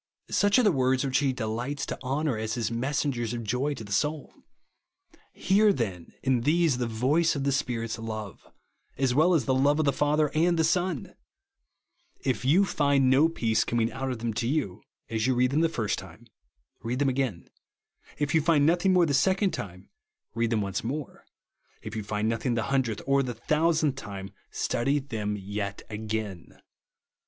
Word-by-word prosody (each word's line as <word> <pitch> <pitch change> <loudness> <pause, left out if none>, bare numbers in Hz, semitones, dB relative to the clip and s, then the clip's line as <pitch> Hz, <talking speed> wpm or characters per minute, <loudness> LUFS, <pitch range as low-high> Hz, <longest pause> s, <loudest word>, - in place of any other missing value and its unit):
Such 205 +2 +3
are 250 - +4
the 210 - +5
words 130 -2 +1
which 135 0 +2
he 140 -2 +1
delights 125 +4 -3
to - - -6
honour 135 +1 -1
as 110 +1 -3
his 115 -2 -2
messengers 125 -1 -1
of 115 - -4
joy 125 +7 -1
to 115 - -8
the 100 - -11
souL 150 +8 -1 1.0
Hear 205 +3 +3
then, 95 - -4
in 130 -3 +2
these, 155 -1 +2
the 120 - 0
voice 140 +9 +1
of 140 - -2
the 140 - +1
Spirit's 115 -4 -2
love, 110 -4 -7 0.5
as 130 -2 +1
well 165 +6 +4
as 140 -7 +1
the 130 - +1
love 140 +3 +3
of 155 - +1
the 140 - +2
Father 150 0 +1
and 170 +2 +2
the 160 - +3
Son! 175 -2 0 1.1
If 130 -1 -1
you 165 +10 +4
find 140 -6 +2
no 145 +5 +5
peace 110 -8 +1
coming 115 0 0
out 135 0 -3
of 125 - -3
them 115 0 -3
to 115 - -2
you, 125 - -1 0.3
as 110 +1 -1
you 130 - +2
read 125 +1 +2
them 150 +3 +2
the 165 - +3
first 115 -10 -2
time, - - -13 0.6
read 120 +2 -2
them 140 +1 +1
again. 130 -9 -1 0.7
If 145 -1 -1
you 160 - +4
find 150 -2 +3
nothing 175 +4 +3
the 145 - -1
second 190 +7 +2
time, 95 - -7 0.4
read 115 0 0
them 110 -2 +1
once 100 -1 -3
more. 140 +4 -5 0.6
If - - -7
you 110 - -2
find 105 +1 -2
nothing 115 +2 0
the 115 - 0
hundredth 120 -6 0
or 140 0 +3
the 125 -3 -3
thousandth 155 +3 +1
time, 100 -5 -7 0.2
study 135 +5 0
them 110 -7 -3
yet 100 0 -5
again. 105 -4 -5
130 Hz, 185 wpm, -27 LUFS, 110-150 Hz, 1.1 s, the